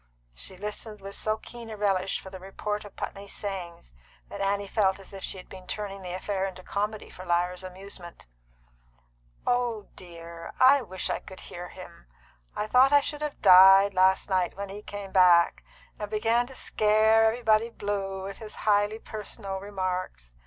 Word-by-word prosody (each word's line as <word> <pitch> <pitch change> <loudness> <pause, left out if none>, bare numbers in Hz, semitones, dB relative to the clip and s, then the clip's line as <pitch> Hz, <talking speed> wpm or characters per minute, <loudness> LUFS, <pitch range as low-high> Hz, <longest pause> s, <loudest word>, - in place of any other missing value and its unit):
She 180 - -5
listened 210 +2 -6
with 195 0 -8
so 215 +1 -1
keen 235 +1 -10
a 215 - -7
relish 195 -2 +1
for 190 - -11
the 190 - -8
report 205 +2 -4
of 205 - -12
Putney's 200 0 -6
sayings 175 - -6 0.4
that - - -6
Annie 200 +1 0
felt 195 -2 +1
as 195 - -13
if 195 - -8
she - - -4
had 185 - -11
been 185 -1 -12
turning 195 0 -5
the 180 -1 -6
affair 190 0 -2
into 185 -1 -9
comedy 210 +2 -3
for 185 - -10
Lyra's 180 +1 0
amusement. 185 -1 -10 1.2
"Oh 240 -4 0
dear, 170 -2 -10
I 265 +2 +7
wish 185 -5 -4
I - - -1
could 190 - -12
hear 175 0 -8
him! - - -12 0.5
I 210 - -1
thought 255 +5 +5
I 290 0 +7
should 295 +1 -5
have 300 -1 -5
died 195 +1 +8
last 190 +1 +3
night 185 -2 0
when 200 0 -5
he 200 +2 -7
came 205 -2 -8
back, 180 -2 +5 0.4
and 210 -1 -4
began 225 +3 +1
to 265 - -12
scare 220 0 +3
everybody 225 0 +3
blue 195 -3 -3
with 195 0 -7
his 215 -1 -9
highly 205 0 +3
personal 210 -3 -6
remarks. 185 - -4
200 Hz, 175 wpm, -27 LUFS, 185-215 Hz, 1.2 s, died